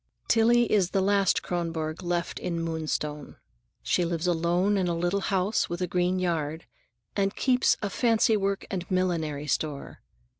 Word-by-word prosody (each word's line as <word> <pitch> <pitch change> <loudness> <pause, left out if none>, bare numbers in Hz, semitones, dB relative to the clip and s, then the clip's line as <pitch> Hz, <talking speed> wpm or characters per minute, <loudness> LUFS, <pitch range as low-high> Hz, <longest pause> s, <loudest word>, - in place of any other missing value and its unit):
Tillie 235 +1 +4
is 195 -4 +3
the 195 - 0
last 195 -1 +2
Kronborg 165 -2 -3
left 175 -1 -2
in 170 -2 -3
Moonstone. 155 -2 -3 0.5
She 180 - +1
lives 170 -1 -2
alone 175 +3 +1
in 190 -2 +1
a 170 -1 -1
little 175 +3 0
house 195 +1 0
with 175 - -4
a 180 - 0
green 180 +1 0
yard, 165 -3 -2 0.5
and 195 -1 0
keeps 255 -1 +2
a - - +1
fancywork 215 -3 +2
and 180 -2 -4
millinery 165 -6 -1
store. 145 0 -3
175 Hz, 150 wpm, -27 LUFS, 165-195 Hz, 0.5 s, Tillie